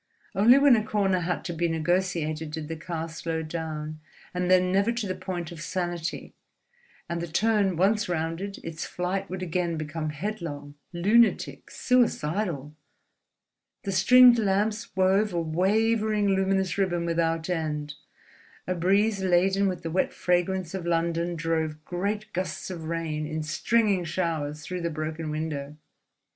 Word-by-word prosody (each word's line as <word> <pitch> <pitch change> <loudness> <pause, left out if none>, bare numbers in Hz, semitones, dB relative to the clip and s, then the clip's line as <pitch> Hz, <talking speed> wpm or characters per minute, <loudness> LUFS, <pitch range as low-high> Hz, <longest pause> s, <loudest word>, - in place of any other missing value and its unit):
Only 230 +7 +6
when 280 -2 +6
a 215 - +1
corner 195 -3 +1
had 175 0 -2
to 175 - -3
be 170 +1 0
negotiated 165 -2 -1
did 155 0 -6
the 165 - -3
car 165 0 -4
slow 165 0 -4
down, 155 -1 -5 0.3
and 180 0 -1
then 185 0 +4
never 200 +4 +3
to 235 -2 -2
the 185 - -1
point 185 -2 -5
of 165 -3 -9
sanity; 175 -1 -3 0.7
and 170 0 -3
the 170 - -3
turn 200 +2 +2
once 210 +3 +2
rounded, 170 +4 -2
its 165 -1 -5
flight 190 +2 -3
would 185 0 -4
again 170 -1 -1
become 155 0 -3
headlong, 150 -4 -5 0.2
lunatic, 210 +7 +2
suicidal. 175 - 0 1.1
The 195 - -2
stringed 245 +5 +7
lamps 210 +2 0
wove 190 +2 +3
a 170 - 0
wavering 210 +5 +1
luminous 190 -1 +1
ribbon 175 -3 +1
without 165 -1 0
end; 150 -4 -2 0.7
a 185 - -1
breeze 195 +4 +2
laden 190 +2 +3
with 180 -2 -3
the 165 - -3
wet 185 - +1
fragrance 180 0 0
of 180 -3 -4
London 170 0 0
drove 160 -1 -2
great 205 +4 -3
gusts 190 +1 -3
of 165 -3 -6
rain 160 -2 -2
in 155 0 -3
stringing 200 +4 +1
showers 160 -3 -2
through 180 +2 -4
the 170 - -1
broken 155 0 -4
window. 150 -2 -4
175 Hz, 150 wpm, -27 LUFS, 160-195 Hz, 1.1 s, stringed